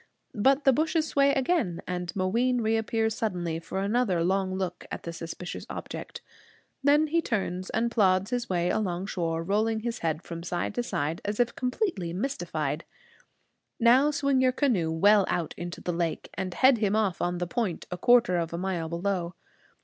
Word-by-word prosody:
But 270 +7 +3
the 270 - +5
bushes 315 +3 +1
sway 280 -1 +3
again, 270 - 0
and 180 -1 -3
Mooween 235 +7 +1
reappears 225 0 +1
suddenly 175 -7 -2
for 190 +3 -4
another 200 -5 +1
long 190 +1 0
look 185 -2 -3
at - - -5
the 170 - -5
suspicious 165 +2 -7
object. - - -7 0.6
Then 290 +2 +5
he 330 +2 +1
turns 190 - -2
and 235 +1 0
plods 195 -1 +2
his 245 -1 -2
way 175 -1 +1
along 185 -3 -1
shore, 165 -4 -2
rolling 220 +4 0
his 235 +1 -3
head 160 0 -2
from 170 -1 -7
side 175 +3 -2
to 245 - -1
side 160 -8 -2
as 205 +2 -3
if 240 -1 +1
completely 250 - -2
mystified. 270 +10 -2 1.0
Now 255 +5 +5
swing 280 -3 +1
your 255 0 +4
canoe 230 - +1
well 205 +5 +5
out 170 -3 -1
into 175 0 -6
the 175 - -2
lake, 170 -1 -2
and 190 -1 -3
head 255 +5 +4
him 210 -1 +1
off 210 -5 0
on 175 0 0
the 175 - -1
point, 215 -3 -2
a 180 - -3
quarter 240 -4 +4
of 165 -1 -2
a - - -2
mile 175 -3 -2
below. 175 0 -2
200 Hz, 180 wpm, -27 LUFS, 175-245 Hz, 1.0 s, the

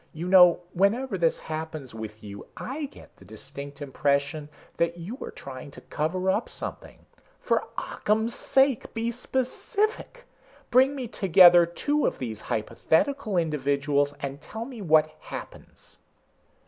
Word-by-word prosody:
You 165 +3 -5
know 180 -2 +7
whenever 210 +6 +1
this 170 -3 +2
happens 155 -4 -6
with 110 -1 -8
you, 100 -1 -9
I 290 +4 -4
get 280 - -14
the - - -17
distinct 140 +8 -9
impression 140 +2 -1 0.3
that 170 0 0
you 175 +8 -6
are - - -5
trying 130 0 -9
to - - -10
cover 185 +5 -1
up - - -1
something. - - -7 0.3
For - - 0
Occam's 220 +3 0
sake, 270 -3 +1
be 230 +1 -1
specific! 405 - -1 0.5
Bring 260 +3 +5
me 260 -3 -4
together 175 -4 +6
two 290 - 0
of - - -2
these 110 -4 -5
hypothetical 205 - 0
individuals 145 -2 0
and 140 +1 -5
tell 220 +1 -6
me 250 -4 -9
what 155 -3 +4
happens." - - -10
170 Hz, 135 wpm, -26 LUFS, 140-230 Hz, 0.5 s, know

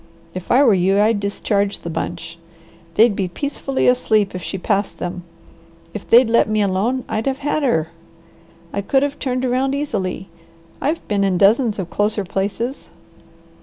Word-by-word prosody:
If 185 -1 -6
I 260 +4 +6
were 235 -6 +5
you 190 +2 +2
I'd 215 0 +3
discharge 200 0 -1
the 170 - -6
bunch. 170 0 -5 0.6
They'd 225 -1 +5
be 195 -2 -1
peacefully 275 +6 -2
asleep 220 -5 +2
if 180 - -5
she 190 - -4
passed 200 +2 -1
them. 180 0 -5 0.7
If 210 - -8
they'd 240 +1 +7
let 230 -1 +3
me 215 -1 +2
alone, 205 +7 0
I'd 220 +4 -2
have 270 0 0
had 300 +1 0
her. 165 - +1 0.8
I 200 - -1
could 270 +7 +1
have 285 0 -3
turned 255 -1 -1
around 260 +2 0
easily. 195 -10 -3 0.5
I've 315 +4 -2
been 200 -2 0
in 190 -2 +1
dozens 215 +3 +3
of 185 -3 -5
closer 205 -1 0
places." 200 +8 -3
210 Hz, 165 wpm, -20 LUFS, 195-255 Hz, 0.8 s, they'd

